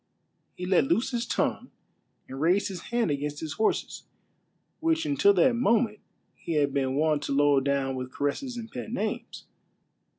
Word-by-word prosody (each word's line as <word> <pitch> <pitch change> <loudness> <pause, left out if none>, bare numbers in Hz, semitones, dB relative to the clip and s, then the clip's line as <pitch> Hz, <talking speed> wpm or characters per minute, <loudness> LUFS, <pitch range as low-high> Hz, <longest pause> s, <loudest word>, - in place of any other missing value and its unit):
He 180 - -5
let 180 -6 +3
loose 225 - +1
his 240 -1 -2
tongue, - - -1 0.6
and 135 +1 -7
raised 180 +6 +2
his 185 -3 -7
hand 235 -8 +1
against 145 +1 -3
his 155 -3 -5
horses, 220 - -1 0.7
which 325 0 +1
until 305 +7 +4
that 260 - +4
moment 230 -3 +2 0.3
he 170 - -6
had 145 -3 +1
been 135 -1 0
wont 155 0 +2
to - - -3
load 140 -1 +3
down 140 -1 0
with 130 0 -5
caresses 240 - -3
and 230 -1 -7
pet 220 - -6
names. 220 -3 -4
170 Hz, 165 wpm, -27 LUFS, 145-235 Hz, 0.7 s, until